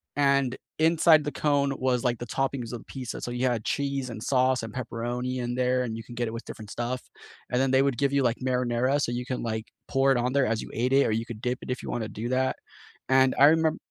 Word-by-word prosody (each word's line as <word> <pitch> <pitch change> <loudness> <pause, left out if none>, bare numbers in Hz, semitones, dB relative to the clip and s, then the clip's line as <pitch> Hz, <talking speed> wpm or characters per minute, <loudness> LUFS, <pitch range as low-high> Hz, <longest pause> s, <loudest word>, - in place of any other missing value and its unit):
and 140 -2 +2 0.2
inside 160 -1 +5
the 150 - -3
cone 140 -2 +1
was, 130 -2 0
like, 120 -2 0
the 120 - -5
toppings 130 -1 -2
of 120 - -7
pizza, 130 -3 -6
so - - -4
you 125 +1 -1
had 120 -3 -1
cheese 140 -2 -1
and 110 -2 -7
sauce 130 -2 +2
and 115 -2 -6
pepperoni 125 +1 -3
in 120 0 -2
there, 125 0 +1
and 115 -2 -4
you 115 - -7
can 120 +1 -11
get 120 -1 -1
it 110 - -5
with 115 - -6
different 105 -1 -9
stuff, 120 +2 -3 0.5
and 125 - +2
then 135 - +2
they 130 0 +5
would 140 -3 0
give 140 -1 +1
you 140 -1 +3
like 120 -1 +1
marinara, 125 +2 +1
so 120 - 0
you 120 +1 -3
can, 130 - -3
like, 110 -1 -3 0.2
pour 135 0 +3
it 135 - +3
on 125 +1 0
there 140 -2 +3
as 110 0 0
you - - -8
ate 125 +3 0
it, 140 - +5
or - - 0
you 115 +1 -1
could 115 -2 -8
dip 125 +1 -1
it - - -9
if 125 - -4
you - - -6
wanna 115 -2 -2
do 110 +3 -5
that, 130 +1 +1 0.5
and 130 0 +4
I 140 - +7
remem 160 +1 +3
125 Hz, 265 wpm, -27 LUFS, 120-135 Hz, 0.5 s, I